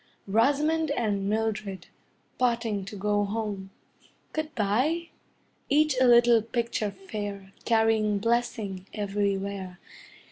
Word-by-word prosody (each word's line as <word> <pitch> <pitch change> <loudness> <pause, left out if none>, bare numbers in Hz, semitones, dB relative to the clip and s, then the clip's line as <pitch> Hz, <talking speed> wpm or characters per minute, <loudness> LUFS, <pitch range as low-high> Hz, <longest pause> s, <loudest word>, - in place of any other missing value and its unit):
Rosamond 290 +9 +2
and 205 -7 0
Mildred, 210 -4 -2 0.5
parting 230 -5 0
to 195 - -8
go 205 +1 +1
home 205 -2 -3 0.6
Good 310 0 -3
bye! 260 +12 +1 0.6
Each 300 0 +3
a 255 - +6
little 240 -1 +6
picture 230 -1 -2
fair, 200 0 -6
Carrying 220 -2 +3
blessing 215 -4 -1
everywhere. 200 -2 -2
215 Hz, 100 wpm, -27 LUFS, 200-240 Hz, 0.6 s, a